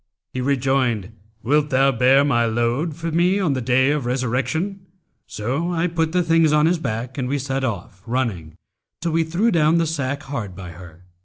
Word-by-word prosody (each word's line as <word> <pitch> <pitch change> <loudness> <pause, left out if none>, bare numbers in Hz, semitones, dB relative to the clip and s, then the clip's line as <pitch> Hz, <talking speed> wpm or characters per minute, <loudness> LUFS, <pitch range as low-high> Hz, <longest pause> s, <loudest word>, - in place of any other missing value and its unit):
He 130 - -3
rejoined, 130 -6 0 0.3
'Wilt 150 +4 +2
thou 135 +1 +3
bear 130 +3 +4
my 120 -5 +2
load 120 +8 -1
for 165 +1 -4
me 175 +4 +2
on 175 -8 +1
the 130 - -2
Day 130 +3 +3
of 145 -5 -1
Resurrection?' 135 - -1 0.4
So 135 +11 -2
I 170 0 0
put 165 -2 0
the 180 +1 +2
things 165 -2 +3
on 150 0 +4
his 170 +1 +2
back, 125 0 -4
and 125 - -1
we 140 +3 0
set 135 0 -3
off, 95 -6 -4
running, 110 -11 -2 0.5
till 170 0 -1
we 165 +1 +2
threw 175 +9 +1
down 160 -1 +3
the 165 - +2
sack 145 -2 -3
hard 115 -9 -5
by 90 -2 -8
her. 85 0 -13
135 Hz, 190 wpm, -21 LUFS, 120-160 Hz, 0.5 s, bear